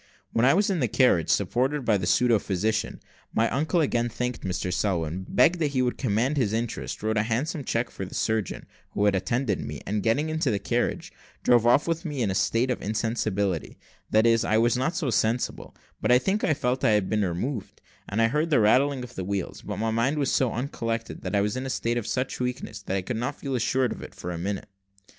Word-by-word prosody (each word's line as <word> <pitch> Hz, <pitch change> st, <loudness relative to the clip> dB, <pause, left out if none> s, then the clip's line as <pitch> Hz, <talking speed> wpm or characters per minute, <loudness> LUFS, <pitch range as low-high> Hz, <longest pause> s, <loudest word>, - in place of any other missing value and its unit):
When 115 Hz, -, +3 dB
I 135 Hz, -, +5 dB
was 200 Hz, +1 st, +2 dB
in 185 Hz, -, 0 dB
the 125 Hz, -, +2 dB
carriage, 110 Hz, -, +3 dB
supported 130 Hz, +8 st, +1 dB
by 110 Hz, -3 st, +3 dB
the 90 Hz, -2 st, -3 dB
pseudo 120 Hz, +1 st, +4 dB
physician, 105 Hz, +3 st, -1 dB, 0.4 s
my 115 Hz, -, +3 dB
uncle 155 Hz, +6 st, +1 dB
again 120 Hz, -5 st, +1 dB
thanked 125 Hz, +2 st, -3 dB
Mr 90 Hz, -1 st, -2 dB
Selwin, 90 Hz, -1 st, -1 dB
begged 165 Hz, +8 st, +4 dB
that 150 Hz, -3 st, 0 dB
he 130 Hz, -1 st, +2 dB
would 125 Hz, -, -1 dB
command 125 Hz, +4 st, +1 dB
his 110 Hz, -6 st, +1 dB
interest, 115 Hz, -2 st, -3 dB
wrote 110 Hz, 0 st, 0 dB
a -, -, +4 dB
handsome 130 Hz, +7 st, -1 dB
check 120 Hz, -1 st, -1 dB
for -, -, -6 dB
the 95 Hz, -, -7 dB
surgeon 110 Hz, -3 st, -1 dB, 0.3 s
who 105 Hz, -, +1 dB
had 105 Hz, -, +4 dB
attended 110 Hz, +3 st, 0 dB
me, 75 Hz, -1 st, -5 dB
and 105 Hz, 0 st, -1 dB
getting 140 Hz, +9 st, +1 dB
into 160 Hz, -3 st, 0 dB
the 105 Hz, -, +1 dB
carriage, 100 Hz, -, -2 dB, 0.3 s
drove 120 Hz, -1 st, +4 dB
off 130 Hz, +6 st, +4 dB
with 165 Hz, 0 st, -1 dB
me 155 Hz, -5 st, -4 dB
still 130 Hz, -, 0 dB
in 100 Hz, -, 0 dB
a -, -, -1 dB
state 115 Hz, +6 st, +1 dB
of 125 Hz, -, -3 dB
insensibility 105 Hz, -5 st, -1 dB, 0.3 s
that 110 Hz, +1 st, +4 dB
is, 115 Hz, -1 st, +4 dB
I 110 Hz, -, +2 dB
was 120 Hz, +2 st, +3 dB
not 130 Hz, +7 st, 0 dB
so 185 Hz, -, -1 dB
insensible, 115 Hz, +2 st, -1 dB, 0.3 s
but -, -, +2 dB
I 125 Hz, -, +8 dB
think 195 Hz, +10 st, 0 dB
I 155 Hz, -, +2 dB
felt 130 Hz, -3 st, -1 dB
I 110 Hz, -, +4 dB
had 100 Hz, -3 st, -1 dB
been 105 Hz, -1 st, 0 dB
removed, 100 Hz, +6 st, -3 dB, 0.3 s
and 110 Hz, +3 st, +1 dB
I -, -, +5 dB
heard 150 Hz, +7 st, 0 dB
the 145 Hz, -, +4 dB
rattling 130 Hz, +5 st, +3 dB
of 125 Hz, -, -9 dB
the 95 Hz, -, -4 dB
wheels; 100 Hz, -1 st, -3 dB
but 105 Hz, -2 st, -5 dB
my 110 Hz, +1 st, 0 dB
mind 120 Hz, +7 st, +1 dB
was 140 Hz, -2 st, +1 dB
so 130 Hz, -3 st, +2 dB
uncollected, 115 Hz, -2 st, -3 dB
and 95 Hz, +2 st, -2 dB
I -, -, +3 dB
was 105 Hz, 0 st, -1 dB
in 130 Hz, +1 st, -3 dB
a -, -, -4 dB
state 120 Hz, -2 st, -1 dB
of 110 Hz, -, -7 dB
such 130 Hz, +1 st, -2 dB
weakness, 125 Hz, -4 st, -4 dB
that 95 Hz, 0 st, -2 dB
I 95 Hz, -, -2 dB
could 115 Hz, +4 st, -3 dB
not 125 Hz, +5 st, -3 dB
feel 135 Hz, -2 st, -4 dB
assured 125 Hz, +1 st, +1 dB
of -, -, -6 dB
it -, -, -10 dB
for 90 Hz, -, -5 dB
a 85 Hz, -, -5 dB
minute. 100 Hz, +4 st, -3 dB
115 Hz, 240 wpm, -26 LUFS, 105-130 Hz, 0.4 s, I